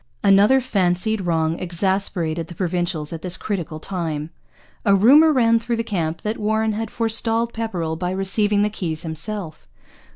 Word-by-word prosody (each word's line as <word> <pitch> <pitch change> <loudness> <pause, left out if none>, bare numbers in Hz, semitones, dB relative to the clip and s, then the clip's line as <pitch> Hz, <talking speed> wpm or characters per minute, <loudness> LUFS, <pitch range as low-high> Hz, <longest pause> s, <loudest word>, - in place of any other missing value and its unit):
Another 205 +6 +5
fancied 205 -2 0
wrong 160 -1 0
exasperated 175 -2 -1
the 175 - -10
Provincials 175 -3 -2
at 165 - -6
this 180 0 -3
critical 175 -7 -4
time. 160 -4 -4 0.5
A 200 -2 +4
rumour 285 +11 +6
ran 230 -4 +3
through 235 +1 -2
the 230 - -2
camp 170 -7 -3
that 215 +1 -3
Warren 220 +1 +1
had 225 +1 -3
forestalled 230 +1 0
Pepperrell 180 -8 -3
by 180 +1 -2
receiving 200 +2 +1
the 210 - 0
keys 165 -6 -4
himself. 160 - -5
195 Hz, 155 wpm, -21 LUFS, 165-220 Hz, 0.5 s, rumour